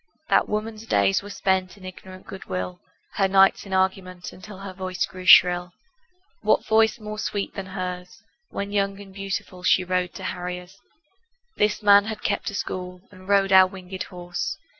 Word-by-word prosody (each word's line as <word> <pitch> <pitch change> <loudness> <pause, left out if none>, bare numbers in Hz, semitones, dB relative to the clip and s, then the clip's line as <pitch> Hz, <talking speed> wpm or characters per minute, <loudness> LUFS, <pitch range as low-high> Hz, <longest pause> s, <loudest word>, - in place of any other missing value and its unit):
That - - +3
woman's 215 +1 -4
days 195 -2 +2
were 205 - -10
spent 190 -2 -1
In 190 - -13
ignorant 185 0 -11
good 190 - -9
will, 90 -1 -4 0.4
Her 195 - +3
nights 195 +1 +4
in - - -10
argument 190 -1 -1
Until 200 +2 -11
her 195 -1 -8
voice 185 -1 -2
grew 185 -1 -10
shrill. 180 0 +7 0.7
What - - +2
voice 220 +1 +3
more 215 0 -7
sweet 205 -1 -3
than 195 -1 -6
hers 180 -1 -6 0.3
When 200 0 -5
young 200 -1 0
and 195 -1 -12
beautiful, 195 -2 -5
She 185 - +3
rode 180 -1 -1
to 190 - -8
harriers? 180 +1 -6 0.8
This 210 +1 +1
man 205 0 +7
had 215 -1 -6
kept 200 - -1
a 200 - -7
school 180 -2 -5
And 185 -1 -15
rode 200 -1 +3
our 190 -1 +8
winged 185 0 -9
horse. 175 -1 -4
190 Hz, 175 wpm, -24 LUFS, 180-200 Hz, 0.8 s, our